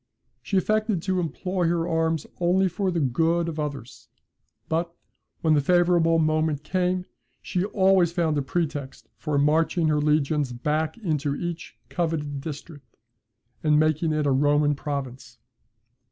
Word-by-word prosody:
She 195 - -1
affected 215 -2 +1
to 190 -1 0
employ 180 +1 -2
her 170 0 0
arms 160 -2 0
only 180 +2 +3
for 190 +2 -1
the 175 -2 -1
good 165 +5 +1
of 160 -2 -4
others; 130 -5 -6 0.6
but, 170 +1 -1 0.5
when 160 -1 +3
the 145 - +3
favourable 175 0 +3
moment 155 -2 +1
came, 180 +2 0 0.3
she 180 +1 -2
always 190 -4 +3
found 170 -3 0
a 145 - +1
pretext 145 -2 -4
for 150 -3 -2
marching 155 +3 +2
her 150 -1 +2
legions 150 -2 +1
back 155 - -1
into 150 -9 -1
each 175 +1 -6
coveted 150 -5 -2
district, 145 -4 -9 0.7
and 150 -1 +4
making 155 +1 +1
it 155 -1 0
a 140 - +2
Roman 145 +2 +3
province. 135 -4 -6
160 Hz, 140 wpm, -25 LUFS, 145-175 Hz, 0.7 s, and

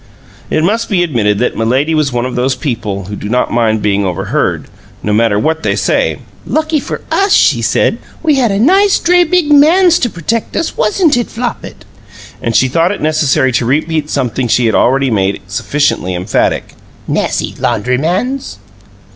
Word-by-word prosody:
It 155 - 0
must 220 +6 0
be 185 -5 +2
admitted 110 -11 0
that 125 - -1
Milady 130 +8 0
was 155 -3 +1
one 120 0 -1
of 130 - -4
those 130 +1 0
people 110 -7 -4
who 100 +2 -6
do 105 - -6
not 125 +2 0
mind 110 -2 +1
being 100 -1 +1
overheard, 90 -3 -2 0.4
no 105 - -1
matter 110 -1 +2
what 160 +8 0
they - - 0
say. - - 0 0.3
"Lucky 310 0 -1
for - - -6
us," 395 0 +1
she - - +3
said, - - +1 0.2
"we 315 -2 +3
had 260 -4 +2
a 195 - 0
nice 380 - +4
dray 355 +1 +3
bid 340 -2 +1
MANS 340 +4 +5
to 240 - 0
protect 215 +6 -3
us, 330 - -2
wasn't 295 - +2
it, 240 - -1
Flopit?" 240 +1 -6 0.6
And 115 -1 -2
she 130 - +4
thought 165 +7 +1
it 205 - -4
necessary 150 -4 +1
to 120 0 0
repeat 155 +2 -1
something 125 -1 -1
she 120 +1 +2
had 110 - +1
already 135 +1 +2
made 100 -2 0
sufficiently 105 -2 -1
emphatic. 90 +1 -1 0.3
"Nassy - - -1
laundrymans!" 175 - -1
145 Hz, 175 wpm, -13 LUFS, -, 0.6 s, MANS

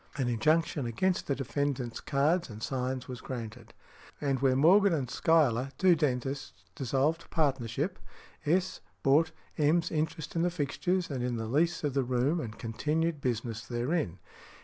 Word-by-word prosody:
An 130 -4 0
injunction 145 +3 +1
against 180 +11 0
the 140 - +1
defendant's 135 -3 -2
cards 155 +5 +1
and 110 0 -8
signs 130 -1 -2
was 125 -1 -7
granted. 115 -2 -7 0.5
|173| 145 - -1
And 135 -1 +1
where 130 -1 +3
Morgan 185 +7 +5
and 140 -5 -1
Schuyler, 135 -6 +3
two 185 -2 +5
dentists, 135 -2 -1 0.2
dissolved 140 +5 0
partnership, 140 - -1 0.4
S. 180 +5 0 0.2
bought 155 +4 +4 0.3
M.'s 160 +3 +3
interest 160 0 -2
in 165 - +1
the 175 - +2
fixtures 175 +2 -1
and 130 -3 -2
in 125 -1 -1
the 110 - -3
lease 160 +10 +1
of 145 -3 0
the 135 - +2
room, 130 +6 +1
and 110 -7 -6
continued 150 +7 -1
business 115 -3 -2
therein. 120 - -1
140 Hz, 155 wpm, -30 LUFS, 125-160 Hz, 0.5 s, Morgan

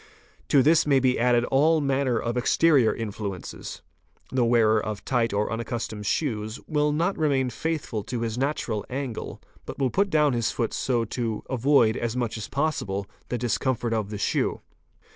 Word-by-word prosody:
'T'o 140 -3 +5
this 155 +2 +4
may 140 -2 +4
be 130 -1 +2
added 120 0 +3
all 155 +4 +4
manner 135 -3 +1
of 115 +1 -2
exterior 130 0 +4
influences: 100 -4 -6 0.5
the 130 -2 +2
wearer 110 -2 +3
of 105 -1 -5
tight 120 -3 +1
or 105 +2 -1
unaccustomed 115 -3 -4
shoes, 110 -5 -1
will 150 -1 +1
not 170 +6 0
remain 135 -5 +1
faithful 155 -9 -3
to 120 +2 -4
his 115 -2 -2
natural 125 -5 -1
angle, 130 -3 -5 0.2
but - - -8
will 135 -3 0
put 200 +1 +1
down 150 -4 +3
his 115 -2 0
foot 115 -2 -2
so 120 -3 0
to 115 -1 -3
avoid 130 -3 +3
as 120 +1 -2
much 120 -3 -1
as 110 -2 -5
possible 135 -10 -1 0.2
the 125 - -1
discomfort 120 0 -1
of 110 -3 -1
the 105 - -5
shoe. 100 - 0
120 Hz, 170 wpm, -25 LUFS, 110-140 Hz, 0.5 s, T'o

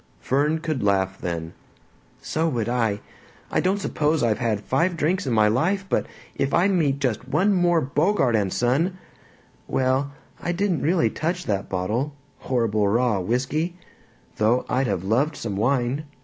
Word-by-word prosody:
Fern 145 +4 +1
could 155 -6 -2
laugh 95 -1 +1
then. 85 -2 -4 0.7
"So 160 +1 0
would 120 -6 -1
I! 115 -4 0 0.5
I - - +2
don't 190 +2 +1
suppose 155 -5 0
I've 110 -2 +1
had 115 -4 0
five 165 - 0
drinks 160 +1 0
in 125 - 0
my 110 -1 +4
life, 175 - +1
but - - 0 0.3
if 135 - 0
I 175 +3 +4
meet 155 -8 +2
just 130 -3 -2
one 195 +9 +2
more 175 -3 +3
Bogart 145 - +2
and 100 -3 +1
Son 150 - +1 0.7
Well, 130 +2 +1 0.3
I 175 - -1
didn't 185 -3 0
really 165 +3 +2
touch 175 +3 -2
that 100 -1 -2
bottle 110 +11 -2 0.2
horrible 110 -5 +1
raw 115 0 +2
whisky 130 - -1 0.6
though 115 +4 +2
I'd 130 +1 +1
have 90 - -1
loved 125 +10 +1
some 105 -4 -4
wine. 125 +6 0
130 Hz, 160 wpm, -24 LUFS, 110-165 Hz, 0.7 s, my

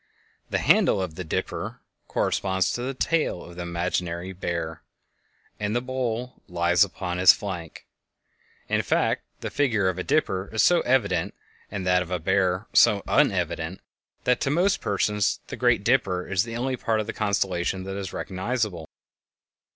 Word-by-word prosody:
The - - +1
handle - - +4
of 95 -4 -3
the 90 - -5
"Dipper" 80 - -3 0.3
corresponds 95 -1 0
to 120 - -3
the 130 +2 -3
tail 155 - 0
of 85 - -12
the 90 - -6
imaginary 85 +1 -2
"Bear," 85 -3 -4 0.8
and 105 +1 -1
the - - +3
bowl 125 -1 -3
lies 90 +1 +3
upon 90 -2 -3
his 90 - +9
flank. 85 -6 -6 0.8
In - - +1
fact, - - +1 0.2
the - - -4
figure 110 -9 +2
of 95 0 -3
a - - -2
dipper 95 -9 0
is 110 - +2
so 175 -1 +5
evident 100 -10 +1 0.3
and 95 -3 -4
that 90 0 +3
of 90 - -5
a 90 - 0
bear 95 +3 +1
so 105 -4 +5
unevident, 80 +4 +1 0.5
that 125 - +2
to - - +1
most 180 +7 +2
persons 105 0 +1
the - - -4
"Great - - +2
Dipper" 90 -2 +1
is 95 -1 +1
the 115 0 -5
only 130 +1 -1
part 110 -2 0
of 110 - -1
the 115 - -4
constellation 95 -3 0
that 95 +1 -5
is 100 -3 -4
recognizable. 95 -3 -3
95 Hz, 165 wpm, -25 LUFS, 90-115 Hz, 0.8 s, his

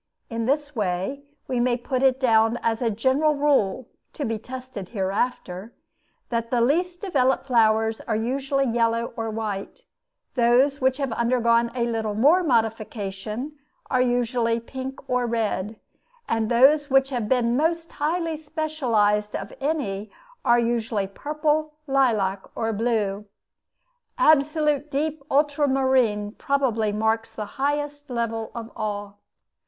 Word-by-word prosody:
In 230 0 -2
this 290 +1 0
way, 195 +6 -2 0.3
we 255 -2 -1
may 240 0 +2
put 255 +1 -2
it 265 -1 +3
down 225 -2 +3
as 230 0 0
a 235 - +2
general 260 +8 +2
rule 265 -6 +1 0.3
(to 290 - -3
be 225 -1 -2
tested 255 -5 -8
hereafter) 195 0 -2 0.5
that 230 -1 -2
the 245 - +1
least 350 +9 +1
developed 270 -12 +1
flowers 220 -3 +2
are 220 - 0
usually 270 +4 0
yellow 230 -1 0
or 225 -1 -3
white; 215 - -4 0.5
those 255 +3 +3
which 260 0 +2
have 275 -4 -2
undergone 235 0 +2
a 240 -2 +1
little 220 -3 -2
more 295 - +5
modification 225 - -2 0.3
are 255 - +3
usually 240 -2 +1
pink 260 +3 -7
or 250 -1 +1
red; 220 -2 -2 0.5
and 225 -1 0
those 280 +5 +5
which 270 +1 +3
have 235 -5 -2
been 240 -2 +2
most 330 +3 0
highly 325 +2 -1
specialized 245 -10 0
of - - -5
any 220 -9 -2 0.3
are 235 - +4
usually 230 -3 0
purple, 300 +7 -1
lilac, 225 -9 +2
or 225 0 -1
blue. 210 -2 -1 0.9
Absolute 300 - +3
deep 300 +2 -2
ultramarine 265 -7 +2
probably 235 -5 0
marks 220 +2 0
the 215 -1 -5 0.2
highest 290 0 -1
level 230 -2 -2
of 230 -1 -6
all. 205 -1 -4
240 Hz, 130 wpm, -24 LUFS, 220-280 Hz, 0.9 s, more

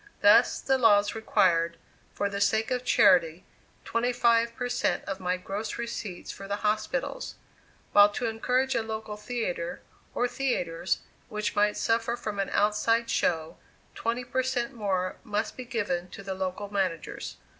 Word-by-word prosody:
Thus - - +6
the 265 -1 +1
laws 205 -3 +5
required, 170 -6 +2 0.3
for 200 - -1
the 200 0 -4
sake 220 +3 +2
of 250 -1 0
charity, 175 -7 +4 0.4
twenty 235 +2 0
five 235 -1 +3
per 245 0 -2
cent 245 - 0
of 195 -1 -4
my 180 0 -1
gross 200 +4 -5
receipts 230 -6 -5
for 195 - -9
the 200 - -1
hospitals; 215 - -1 0.6
while 205 0 +7
to 245 - -2
encourage 250 +4 0
a - - +1
local 220 -1 -5
theatre, 210 -6 -3 0.4
or 245 - +2
theatres, 190 -10 -1 0.3
which 210 -1 -2
might 210 0 +2
suffer 230 +1 +1
from 215 -4 -5
an 195 - 0
outside 230 +3 +2
show, 160 -2 0 0.4
twenty 235 +2 -2
per 255 +1 -1
cent 255 0 -2
more 190 -5 -1
must 210 +1 -2
be 255 - -7
given 200 -8 -2
to 200 - -10
the 195 -1 -4
local 190 +2 -4
managers. 185 -5 -2
210 Hz, 155 wpm, -28 LUFS, 195-235 Hz, 0.6 s, while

